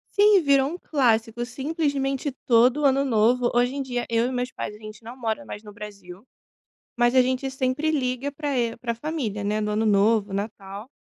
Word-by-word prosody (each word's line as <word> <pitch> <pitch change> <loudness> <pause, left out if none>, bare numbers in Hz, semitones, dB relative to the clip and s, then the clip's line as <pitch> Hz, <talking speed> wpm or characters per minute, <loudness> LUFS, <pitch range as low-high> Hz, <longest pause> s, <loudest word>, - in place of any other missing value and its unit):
Sim, 410 -3 +5
virou 275 -1 +3
um 345 - -6
clássico. 235 -7 0
Simplesmente 275 +1 -2
todo 245 +4 +4
o - - +1
ano 275 0 +3
novo 240 0 +2
Hoje 245 +1 +2
em 280 - -2
dia, 245 -2 -3
eu 230 0 +1
e - - -3
meus 250 0 -2
pais, 210 - -6
a - - -13
gente 215 +1 -11
não 235 +3 -10
mora 230 +2 -3
mais 210 -6 -9
no 210 -1 -12
Brasil. 200 -3 -10 0.7
Mas, 240 +1 +2
a 255 - +7
gente 260 +1 -1
sempre 265 +4 -1
liga 265 -2 -1
pra 285 -1 -3
e, 235 -2 -1
pra 235 -1 -3
família 235 -6 -4
né. 210 +1 -1
No 210 0 -2
Ano 215 +1 0
Novo, 205 0 +2
Natal. 200 +1 -6
245 Hz, 200 wpm, -24 LUFS, 215-275 Hz, 0.7 s, a